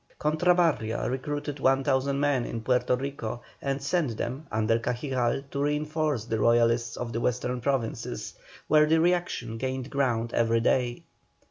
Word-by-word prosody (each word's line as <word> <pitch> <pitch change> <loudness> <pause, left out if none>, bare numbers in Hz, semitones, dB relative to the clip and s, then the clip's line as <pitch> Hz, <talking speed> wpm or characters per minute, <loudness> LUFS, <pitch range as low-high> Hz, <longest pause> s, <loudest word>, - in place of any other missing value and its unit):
Cortabarria 155 -7 +2
recruited 145 +3 -3
1,000 135 +1 +2
men 145 -3 +2
in 115 -1 -4
Puerto 125 +1 +2
Rico 125 -3 -5 0.2
and 140 0 -1
sent 140 -7 0
them, 135 +6 -4
under 110 +1 +2
Cajigal, 125 +1 -1
to 140 - -2
reinforce 150 -3 0
the 110 -2 -2
Royalists 115 +1 +3
of 120 -1 -4
the 115 - -2
Western 125 +1 -1
Provinces, 130 -3 -2 0.3
where 150 0 +5
the 160 +1 +4
reaction 170 -10 0
gained 130 +1 -3
ground 120 -4 0
every 115 0 +2
day. 120 0 +1
130 Hz, 140 wpm, -27 LUFS, 115-145 Hz, 0.3 s, where